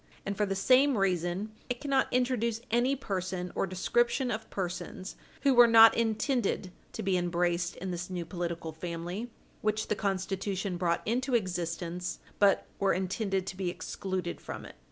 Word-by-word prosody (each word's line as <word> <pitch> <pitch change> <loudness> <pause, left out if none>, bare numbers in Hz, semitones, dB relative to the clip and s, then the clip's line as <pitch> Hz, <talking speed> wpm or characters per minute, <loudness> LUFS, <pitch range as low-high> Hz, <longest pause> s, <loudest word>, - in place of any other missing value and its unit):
And, 200 - -2
for 210 +1 +1
the 195 - -1
same 260 +6 +4
reason, 185 +1 0 0.2
it 245 -1 -2
cannot 275 -2 +1
introduce 245 -3 +1
any 245 +4 +3
person 185 -7 -3
or - - 0
description 240 +7 +1
of 220 0 -4
persons 185 0 -4 0.3
who 275 -2 +5
were 240 -1 +8
not 225 -1 +9
intended 225 -3 0 0.2
to - - -4
be 190 -1 +2
embraced 175 0 0
in 185 +1 -5
this 175 0 -4
new 180 -2 -3
political 170 -2 -4
family 175 +7 -5 0.3
which 215 0 0
the 210 - +2
Constitution 195 -1 -2
brought 170 -1 0
into 250 +3 +1
existence, 175 -3 -2 0.2
but 200 -1 +4
were 195 -1 +3
intended 190 +1 -1
to 190 - -5
be 185 -1 -2
excluded 180 +1 -4
from - - -7
it. - - -10
195 Hz, 160 wpm, -30 LUFS, 180-230 Hz, 0.3 s, not